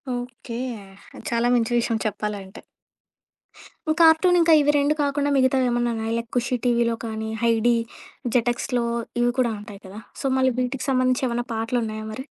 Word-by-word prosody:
Okay. 245 -1 -7 0.7
చాలా 235 +1 +1
మంచి 235 0 +1
విషయం 230 -1 0
చెప్పాలంటే. 205 -1 -4 1.4
కార్టూన్ 330 +2 +6
ఇంకా, 330 -1 +5
ఇవి 295 +1 +3
2 285 +1 +2
కాకుండా 285 0 0
మిగతావేమన్నా 250 -2 +2
ఉన్నాయా? 225 +1 -3
లైక్ 230 0 -5
'ఖుషీ 245 +1 0
టీవీలో' 235 -1 +2
కానీ, 220 0 -4
'హైడీ', 235 0 +3 0.6
'జెటెక్స్‌లో' 240 0 0 0.4
ఇవి 245 0 +3
కూడా 240 -3 +2
ఉంటాయి 205 -1 -11
కదా! 195 +3 -9 0.2
సో, - - -6
మళ్ళీ 260 0 +3
వీటికి 255 +1 -2
సంబంధించి 255 0 +1
ఏవన్నా 240 0 -2
పాటలున్నాయా 225 -1 -2
మరి? 260 +5 -7
240 Hz, 140 wpm, -23 LUFS, 225-260 Hz, 1.4 s, కార్టూన్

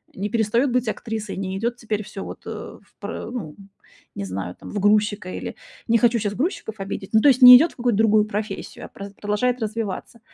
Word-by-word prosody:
не 200 +2 -3
перестаёт 230 +5 +1
быть 250 -1 0
актрисой, 220 -1 -5
не 190 0 -3
идёт 235 +4 -1
теперь 215 -3 -3
всё 205 -1 -8
вот, - - -9
э, - - -4 0.3
в - - -31
пр - - -6
э, - - -6
ну 175 -12 -6 0.6
не 100 - -4
знаю, 95 -1 -5
там, - - -10
в 205 - -3
грузчика 205 -1 +2
или... - - -6 0.3
Не 230 0 +4
хочу 235 0 +3
сейчас 205 -1 -2
грузчиков 260 - -3
обидеть. 195 0 -5
Ну, 220 - +5
то 290 - +6
есть, 260 0 +3
не 250 - +12
идёт 320 +6 +2
в - - -30
какую-то 240 -4 +1
другую 215 -1 +4
профессию, 210 -1 -5
а - - -11
праз 200 0 -10
продолжает 210 +5 -1
развиваться. 220 +1 -4
215 Hz, 220 wpm, -22 LUFS, 200-235 Hz, 0.6 s, не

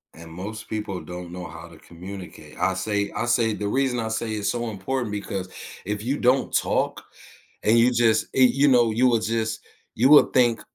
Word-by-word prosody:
And 80 0 -12
most 105 +6 -7
people 105 -4 -4
don't 90 -1 -8
know 90 -1 -7
how 80 0 -10
to 85 - -15
communicate, 90 +2 -11
I 95 - +1
say 100 +1 -1
I - - -1
say 115 -2 +2
the 105 0 -3
reason 130 +2 0
I 110 -1 -2
say 110 0 -3
it's 105 -1 -1
so 120 -1 -2
important 110 +3 -3
because 100 -2 -4 0.4
if 105 +1 -3
you 135 +5 -1
don't 125 +2 +2
talk - - 0 0.6
and 110 +2 +4
you 125 +2 +4
just 115 -2 +2
e 130 - +5
you 135 +3 +4
know, 120 -4 +4
you 120 +4 +3
would 115 -3 +2
just 110 0 -2 0.3
you 130 +4 +3
would 150 0 +7
think 120 -3 +3
110 Hz, 200 wpm, -24 LUFS, 95-120 Hz, 0.6 s, would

